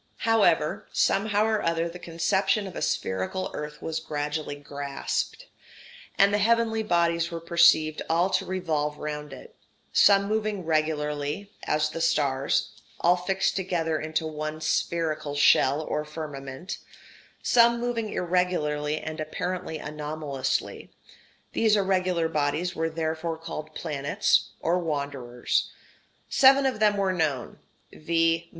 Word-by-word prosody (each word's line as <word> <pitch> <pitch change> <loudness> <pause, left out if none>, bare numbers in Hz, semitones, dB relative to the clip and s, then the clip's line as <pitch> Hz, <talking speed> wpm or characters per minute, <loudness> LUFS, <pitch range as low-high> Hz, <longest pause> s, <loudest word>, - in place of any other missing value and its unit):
] - - -39 0.2
However, 165 -8 +2
somehow 205 +1 +2
or 220 -1 +1
other 165 0 0
the 175 +1 -9
conception 190 +5 0
of 190 - -8
a - - -4
spherical 95 - -2
earth 150 0 -6
was 160 0 -2
gradually 150 -1 -3
grasped, 145 - -4 0.7
and 200 +1 +5
the 205 - +3
heavenly 225 +1 +2
bodies 170 -4 +1
were 170 -1 -5
perceived 165 -2 +4
all 170 +3 +3
to - - +1
revolve 155 -5 -2
round 150 -1 -5
it: 130 - -12 0.4
some 200 -1 +6
moving 210 -3 -1
regularly, 155 +3 -1 0.2
as 155 0 +1
the 165 - -5
stars, 140 -5 +1 0.3
all 175 +1 +4
fixed 190 +2 0
together 170 -4 -1
into 160 +1 -2
one 155 0 -4
spherical 155 -1 -1
shell 145 0 +4
or 150 0 -2
firmament; 150 +1 -7 0.6
some 235 0 +5
moving 235 -2 -2
irregularly 155 -4 0
and 155 0 -6
apparently 175 +2 -3
anomalously 150 -2 -3 0.6
these 220 -2 +3
irregular 185 -4 +1
bodies 160 +3 -1
were 165 0 -1
therefore 160 0 -3
called 155 -1 -7
planets 135 -7 +1
[or 175 +2 +1
wanderers]. 140 -7 -2 0.6
Seven 270 +1 +6
of 255 -5 0
them 210 -1 +3
were 195 -1 +1
known, 150 -8 -2 0.3
viz. 165 +1 +1
165 Hz, 130 wpm, -26 LUFS, 150-185 Hz, 0.7 s, some